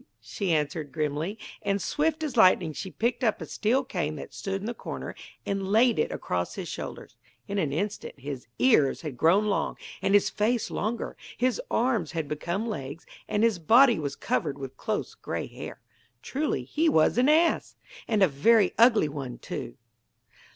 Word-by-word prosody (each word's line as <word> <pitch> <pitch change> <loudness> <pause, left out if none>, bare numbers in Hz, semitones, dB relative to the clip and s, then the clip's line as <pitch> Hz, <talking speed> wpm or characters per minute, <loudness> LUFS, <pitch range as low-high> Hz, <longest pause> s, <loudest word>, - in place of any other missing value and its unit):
she 195 -4 -3
answered 150 -1 -1
grimly: 155 +7 -2 0.2
and, 200 -1 0
swift 315 +7 0
as 290 -5 -3
lightning 185 -6 +5
she 190 - -5
picked 235 +6 -1
up 220 -3 +2
a - - -5
steel 245 +5 +1
cane 170 - -2
that 145 - -9
stood 195 0 -3
in 200 - -7
the 235 - -2
corner - - -6 0.3
and 195 -1 -2
laid 235 +3 +4
it - - +1
across - - -3
his - - -5
shoulders. - - -7 0.3
In 200 0 -1
an 150 -6 0
instant 195 -1 -3
his 135 -2 -6
ears 220 - +4
had 150 -5 -5
grown 175 - +4
long 205 - 0 0.2
and 195 - +3
his 205 - +5
face 225 +2 0
longer, 225 +3 -2 0.2
his 250 0 +1
arms 225 - +1
had 160 -3 -2
become 170 +8 -2
legs, 145 - -5 0.2
and 210 - +1
his 225 -6 +3
body 235 - +6
was 140 -2 -3
covered 135 +2 -1
with 135 -1 -7
close - - -3
grey - - -4
hair. - - -9 0.4
Truly, 295 +3 -1
he 320 +2 +1
was 160 - +3
an 255 +3 +4
ass; 325 +2 +3 0.3
and 215 -3 +3
a - - +7
very 195 +8 +4
ugly 230 -8 +6
one, 135 -4 -6
too! - - -6
200 Hz, 180 wpm, -27 LUFS, 150-235 Hz, 0.4 s, a